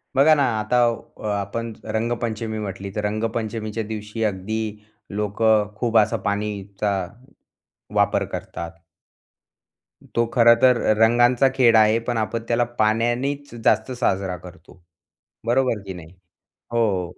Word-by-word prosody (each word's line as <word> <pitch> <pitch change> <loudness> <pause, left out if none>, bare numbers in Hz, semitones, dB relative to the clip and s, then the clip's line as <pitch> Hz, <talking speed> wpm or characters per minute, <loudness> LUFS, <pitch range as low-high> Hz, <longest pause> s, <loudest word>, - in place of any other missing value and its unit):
बघा 140 +4 +6
ना 145 - +2 0.2
आता 110 +3 0 0.4
अ, - - -8
आपण 105 +3 -3
रंगपंचमी 110 0 -2
म्हटली 100 -1 -5
तर, 105 - -2
रंगपंचमीच्या 110 0 -2
दिवशी 110 +1 -5
अगदी 105 +1 -2 0.6
लोकं 105 0 +2
खूप 115 +1 +1
असा 105 - +3
पाणीचा 100 0 -2 1.0
वापर - - +2
करतात. 85 - -6 1.5
तो 115 - +3
खरं 115 -1 +7
तर 125 -1 +6 0.2
रंगांचा 120 +3 +4
खेळ 120 -3 +5
आहे, 110 0 +5
पण 120 0 -3
आपण 115 +1 -2
त्याला 120 +1 +2 0.2
पाण्यानीच 120 +6 0
जास्त 110 +3 +2
साजरा 95 -7 -1
करतो. 90 0 -15 0.7
बरोबर 125 -1 +2
की 95 - -4
नाही? 85 0 -12 0.6
हो. 100 -7 0
110 Hz, 120 wpm, -22 LUFS, 105-120 Hz, 1.5 s, खरं